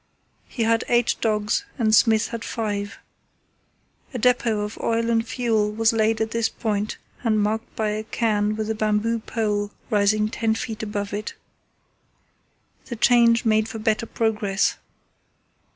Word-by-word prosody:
He 235 - -3
had 225 +1 +2
eight 240 -1 +3
dogs 210 - 0
and 220 -4 +2
Smith 220 0 +4
had 230 -1 -5
five. 205 -3 -3 1.2
A - - 0
depot 240 -3 +2
of 210 +1 -5
oil 230 0 0
and 225 0 +1
fuel 225 -3 0
was 225 +1 +2
laid 220 0 +2
at 220 0 -1
this 230 -1 0
point 210 -2 -2 0.3
and 220 -3 +2
marked 220 +3 -2
by 215 -1 0
a 215 +1 -2
cairn 215 -2 0
with 220 0 -2
a - - +1
bamboo 215 +1 0
pole 210 -2 -2 0.2
rising 210 0 +3
ten 220 0 0
feet 220 -1 -5
above 205 -2 -4
it. 210 +2 -4 1.5
The 240 - -6
change 235 0 +4
made 220 0 +2
for 225 - -6
better 220 +1 0
progress. 210 -4 0
220 Hz, 150 wpm, -23 LUFS, 210-230 Hz, 1.5 s, Smith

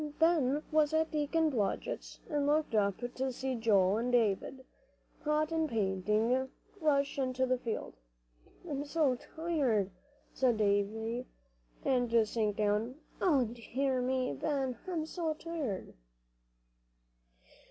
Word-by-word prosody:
Ben 305 -3 +3
was 310 0 +3
at 320 0 +2
Deacon 310 +1 +1
Blodgett's, 215 -7 -2
and 290 -4 0
looked 300 -2 +2
up 200 -3 +2
to 255 +2 -2
see 260 +1 -3
Joel 210 -4 +3
and 240 +2 -1
David, 245 +3 +1 0.6
hot 305 +1 +1
and 320 -1 +1
panting, 215 +4 +1 0.3
rush 285 -3 +1
into 260 -1 +1
the 255 -1 +1
field. 230 -3 -4 0.7
"I'm 285 -3 -2
so 290 -2 +2
tired," 260 - -1 0.4
said 250 -4 +2
Davie, 220 +4 0 0.6
and 250 -3 +2 0.2
sank 210 -2 -1
down; 215 +4 +1 0.3
"O 285 -9 +4
dear 250 +3 -1
me, 255 - 0
Ben, 265 - -1
I'm 335 -4 -1
so 320 -1 -2
tired." 305 - -4
260 Hz, 120 wpm, -32 LUFS, 225-300 Hz, 0.7 s, O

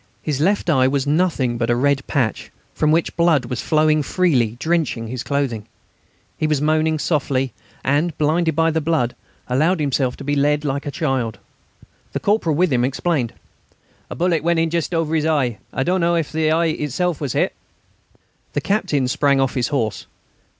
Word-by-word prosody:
His 145 -3 -1
left 200 +4 +1
eye 130 -6 +4
was 135 0 0
nothing 145 -6 +1
but 115 -1 0
a 120 - +3
red 140 +2 +1
patch, 125 -7 -1 0.2
from 155 - +1
which 160 +2 +1
blood 165 -6 +3
was 125 +1 -4
flowing 155 0 +2
freely, 135 - +1
drenching 160 -8 0
his 125 0 -4
clothing. 130 -7 -2 0.7
He 155 - +1
was 150 -2 +1
moaning 155 +1 +1
softly 135 -5 0 0.3
and, 145 +4 0
blinded 160 +1 +1
by 165 +1 +3
the 160 0 0
blood, 150 -6 0 0.3
allowed 155 +8 +2
himself 135 -3 0
to - - -8
be 145 +1 -1
led 150 +1 +1
like 140 +1 -2
a - - 0
child. 135 - -1 0.8
The - - -1
corporal 200 -7 +1
with 175 -2 +2
him 120 -1 +2
explained: 135 -1 -1 0.8
"A - - -6
bullet 170 -3 +1
went 170 0 +2
in 165 0 +1
just 170 0 -1
over 165 -1 0
his 160 -1 +1
eye. 135 -8 0
I 135 - -1
don't 180 +4 +1
know 170 0 +2
if 165 -3 -1
the 160 -1 +1
eye 165 +2 +2
itself 160 +1 -1
was 140 -5 -2
hit." - - +1 1.0
The 145 - -1
Captain 145 -8 0
sprang 140 +1 +2
off 135 -1 +1
his 125 -3 0
horse. 115 -8 -2
150 Hz, 185 wpm, -20 LUFS, 130-165 Hz, 1.0 s, eye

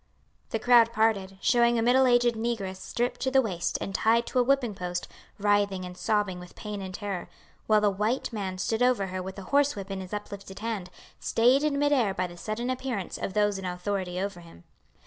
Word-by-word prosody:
The - - -1
crowd 235 0 +5
parted, 205 -4 +1
showing 240 -1 +4
a 225 - +1
middle 255 +2 +5
aged 245 -1 +4
negress 220 -4 -3
stripped 240 +5 -3
to 260 - +1
the 265 0 +4
waist 175 -8 -1
and 195 - -4
tied 230 +3 +3
to 255 - 0
a - - +5
whipping 255 -3 +2
post, 180 -2 -4 0.3
writhing 205 -2 +1
and 180 0 -8
sobbing 195 -1 0
with 180 0 -12
pain 210 -1 -6
and 190 -1 -6
terror, 195 -2 -5 0.4
while 215 -1 +4
a - - +5
white 215 +6 -1
man 190 -4 -3
stood 220 +5 -1
over 245 -5 +3
her 185 0 -4
with 190 +1 -7
a 195 - -7
horse 285 0 +4
whip 195 -1 -7
in 195 -1 -3
his 185 - -9
uplifted 200 -2 -7
hand, 215 -5 -4 0.3
stayed 250 +4 +3
in 300 -2 +1
mid 290 0 +2
air 225 -8 +2
by 185 - 0
the 175 -1 -8
sudden 215 +7 -3
appearance 255 -7 -4
of 190 - -3
those 205 -2 +2
in 190 - -6
authority 180 0 -3
over 195 -2 -3
him. 165 - -15
210 Hz, 215 wpm, -27 LUFS, 190-240 Hz, 0.4 s, crowd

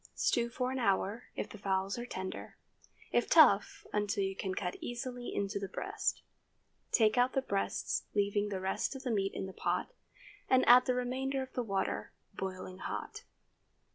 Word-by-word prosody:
Stew 235 0 +2
for 250 +2 -2
an 265 - -2
hour, 205 +1 +1
if - - -3
the 215 - -10
fowls 195 +2 0
are 240 - -5
tender; 190 -5 -6 0.5
if 240 - +2
tough, 255 -11 +6
until 205 0 +1
you 195 0 -2
can 190 -1 -3
cut 180 -2 -2
easily 245 0 -5
into 200 0 -1
the 195 - -4
breast. 395 - -2 0.7
Take 220 +1 +4
out 250 +1 +3
the 270 - +2
breasts, 200 -5 -1
leaving 205 0 +1
the 195 -2 -2
rest 190 +8 -1
of 270 - -7
the 250 - -1
meat 195 -3 0
in - - -3
the 190 - -7
pot, - - -1 0.6
and 260 0 +4
add 250 +1 +8
the 255 - +2
remainder 265 +2 -1
of 260 - -11
the 250 - 0
water—boiling 190 -2 -4
hot. - - -5
215 Hz, 170 wpm, -33 LUFS, 195-250 Hz, 0.7 s, add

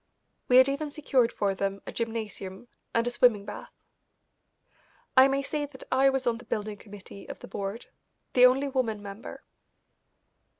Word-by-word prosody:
We 250 - +6
had 260 +1 +8
even 285 +2 -2
secured 275 -5 +1
for 200 -1 0
them 195 +1 -2
a - - -6
gymnasium 220 -2 -5 0.2
and 230 0 +1
a 245 - 0
swimming 230 -5 +3
bath. - - -8 1.4
I 260 0 +8
may 275 0 0
say 290 +1 -2
that 265 -2 -13
I 270 +1 +5
was 270 -1 -1
on 235 -1 0
the 245 - -13
building 210 -1 -3
committee 200 -1 -12
of - - -6
the - - -11
board, 200 +3 -5 0.5
the 250 0 +8
only 270 +3 +1
woman 235 -6 -1
member. 200 +2 -9
240 Hz, 165 wpm, -28 LUFS, 205-265 Hz, 1.4 s, had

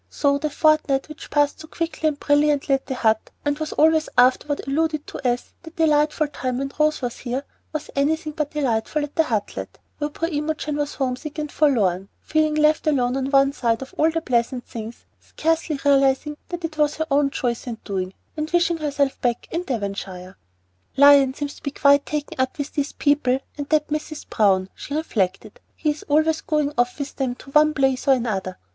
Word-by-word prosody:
So 280 -1 +1
the 305 - -1
fortnight, 305 -2 +2
which 305 - -10
passed 290 -1 +1
so 315 - -10
quickly 325 -1 -2
and 295 -2 -1
brilliantly 290 -1 +2
at 270 - 0
the 265 - -3
Hut, 220 -3 +1 0.2
and 290 +1 0
was 310 -1 -3
always 315 0 +3
afterward 255 +3 +3
alluded 305 +2 0
to - - -8
as 245 -1 -1
"that 325 -1 -12
delightful 305 -1 +2
time 255 -3 -3
when 275 +1 -3
Rose 305 -2 +2
was 245 -1 -3
here," 255 +2 -3 0.3
was 310 -1 -5
anything 305 +2 0
but 300 -1 -2
delightful 285 0 -1
at 290 - -7
the 320 - +3
"Hutlet," 215 -6 -3 0.2
where 295 0 -1
poor 330 +2 -3
Imogen 300 -1 -2
sat - - -10
homesick 270 +3 -3
and 300 -1 -3
forlorn, 200 - +2
feeling 310 -1 +1
left 305 0 +3
alone 255 -4 +2
on 270 0 -1
one 275 0 +4
side 235 -2 0
of 265 - -13
all 315 - +3
the 325 0 -1
pleasant 245 -2 0
things, 225 0 -8
scarcely 325 -1 -1
realizing 275 +1 +3
that 350 -1 -4
it 310 -1 -6
was 295 0 +2
her 315 - -2
own 280 0 +3
choice 245 -2 -3
and 230 -2 -6
doing, 190 -2 -3 0.2
and 310 0 -3
wishing 345 -1 +2
herself 285 -3 -1
back 240 -1 -1
in 335 - -1
Devonshire. 195 - -4 0.6
"Lion 280 -1 +7
seems 290 -1 -5 0.2
quite 285 0 +5
taken 300 -3 -4
up 260 - -1
with 285 0 -4
these 285 0 -1
new - - -43
people 285 -3 +2 0.2
and 285 -1 -6
that 305 -1 +2
Mrs. 305 0 -4
Browne," 190 -3 +2
she 285 - -6
reflected. 210 - -2 0.2
"He's 300 -1 -1
always 315 +2 +3
going 300 -2 0
off 245 0 +1
with 280 -1 -5
them 260 -3 -1
to 275 - -14
one 305 +1 +4
place 270 -1 +1
or 270 - +7
another. 195 -7 -3
285 Hz, 195 wpm, -23 LUFS, 255-305 Hz, 0.6 s, Lion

